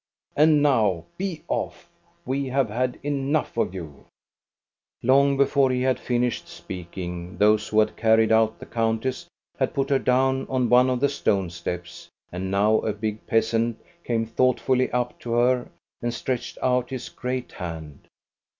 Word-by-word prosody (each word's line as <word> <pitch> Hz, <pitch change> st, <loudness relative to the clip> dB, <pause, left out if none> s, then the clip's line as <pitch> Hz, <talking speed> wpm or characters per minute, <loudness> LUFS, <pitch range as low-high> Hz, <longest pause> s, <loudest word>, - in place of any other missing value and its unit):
And 150 Hz, 0 st, +5 dB
now 105 Hz, -, +2 dB
be 185 Hz, -4 st, -3 dB
off! -, -, -3 dB, 0.4 s
We 135 Hz, +2 st, -1 dB
have 130 Hz, -4 st, 0 dB
had 125 Hz, +3 st, -1 dB
enough 145 Hz, +1 st, -1 dB
of 105 Hz, -5 st, -1 dB
you! 80 Hz, -6 st, -9 dB, 0.5 s
" -, -, -51 dB
Long 140 Hz, +2 st, +4 dB
before 140 Hz, -1 st, +3 dB
he 125 Hz, 0 st, 0 dB
had 130 Hz, -1 st, +1 dB
finished 120 Hz, -1 st, -1 dB
speaking, 90 Hz, 0 st, -7 dB
those 105 Hz, +1 st, +3 dB
who 110 Hz, -, +2 dB
had 105 Hz, -, -1 dB
carried 110 Hz, 0 st, +3 dB
out 110 Hz, 0 st, +3 dB
the -, -, -10 dB
countess 115 Hz, +7 st, -1 dB, 0.3 s
had -, -, 0 dB
put 135 Hz, 0 st, 0 dB
her 135 Hz, -, +4 dB
down 130 Hz, +1 st, +1 dB
on 130 Hz, -3 st, +1 dB
one 125 Hz, +2 st, +5 dB
of 125 Hz, -1 st, -1 dB
the 140 Hz, -, +4 dB
stone 100 Hz, -10 st, 0 dB
steps; 85 Hz, 0 st, -6 dB, 0.2 s
and 95 Hz, +1 st, -4 dB
now 105 Hz, +3 st, +3 dB
a 110 Hz, -, -1 dB
big 105 Hz, +1 st, -4 dB
peasant 115 Hz, 0 st, +1 dB, 0.3 s
came 115 Hz, -2 st, 0 dB
thoughtfully 130 Hz, +2 st, +1 dB
up 125 Hz, 0 st, -2 dB
to 115 Hz, -, -4 dB
her 125 Hz, +1 st, +2 dB, 0.3 s
and 120 Hz, -, -1 dB
stretched 125 Hz, -1 st, -3 dB
out 125 Hz, -1 st, +1 dB
his 130 Hz, -2 st, -5 dB
great 125 Hz, 0 st, -4 dB
hand. 80 Hz, -5 st, -8 dB
120 Hz, 160 wpm, -24 LUFS, 105-130 Hz, 0.5 s, And